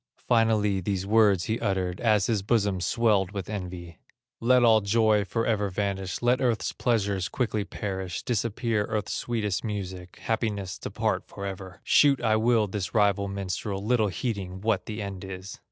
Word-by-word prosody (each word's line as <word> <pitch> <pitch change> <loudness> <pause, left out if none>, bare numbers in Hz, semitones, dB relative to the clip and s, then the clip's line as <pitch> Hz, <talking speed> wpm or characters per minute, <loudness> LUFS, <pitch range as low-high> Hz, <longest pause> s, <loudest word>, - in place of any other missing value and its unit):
Finally 110 -4 +3
these 95 0 -2
words 105 -3 +4
he 110 +1 -1
uttered 95 -4 -1
As 105 -4 +3
his 110 -4 0
bosom 100 -3 +1
swelled 105 -1 +2
with 100 -3 -4
envy: 90 -4 -6 0.4
"Let 125 +1 +4
all 110 -2 +6
joy 105 0 +3
forever 110 -1 0
vanish, 95 0 -3
Let 125 +2 +3
earth's 120 -4 +1
pleasures 100 -6 0
quickly 110 -5 -1
perish, 95 -3 -4
Disappear 115 -1 0
earth's 105 -1 -2
sweetest 105 -6 -2
music, 95 -4 -5
Happiness 105 -5 -2
depart - - -2
forever; 95 -1 -7
Shoot 140 -3 +5
I 110 -2 +2
will 115 -1 +3
this 100 +1 -4
rival 100 -2 +3
minstrel, 100 +1 -4
Little 115 -2 +3
heeding 95 -3 -4
what 110 -2 0
the 110 -1 -4
end 100 -1 -6
is." 95 0 -8
105 Hz, 155 wpm, -27 LUFS, 95-115 Hz, 0.4 s, all